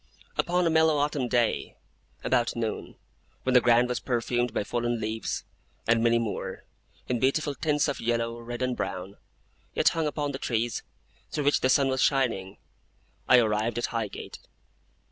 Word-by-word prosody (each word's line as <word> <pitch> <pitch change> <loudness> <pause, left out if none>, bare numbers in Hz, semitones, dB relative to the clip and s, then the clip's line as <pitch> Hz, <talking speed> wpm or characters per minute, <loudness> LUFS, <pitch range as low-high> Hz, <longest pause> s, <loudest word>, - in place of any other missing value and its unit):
Upon 180 +1 +1
a 165 - +3
mellow 160 -1 +4
autumn 145 -3 0
day, 120 -1 0 0.5
about 120 -2 +1
noon, 115 -2 -3 0.5
when 130 - +1
the 125 - +7
ground 120 +1 +4
was 125 -1 -1
perfumed 120 -1 0
by - - -1
fallen 120 +1 -1
leaves, 110 +1 -3 0.4
and 115 0 +3
many 115 0 +4
more, 115 -3 -3 0.4
in 125 -2 0
beautiful 140 +4 +1
tints 150 +2 +1
of 140 - -2
yellow, 115 0 -1
red, 120 +1 -5
and 125 -1 0
brown, 95 -1 -4 0.6
yet - - +5
hung 165 -2 -1
upon 145 -1 -2
the 135 - -5
trees, 115 0 -1 0.5
through 150 - -2
which 145 +1 +3
the 130 - +2
sun 135 +1 +4
was 130 -1 0
shining, 115 -9 +1 0.7
I 125 - +8
arrived 110 0 +1
at 120 - 0
Highgate. 115 -3 -4
120 Hz, 165 wpm, -27 LUFS, 115-140 Hz, 0.7 s, I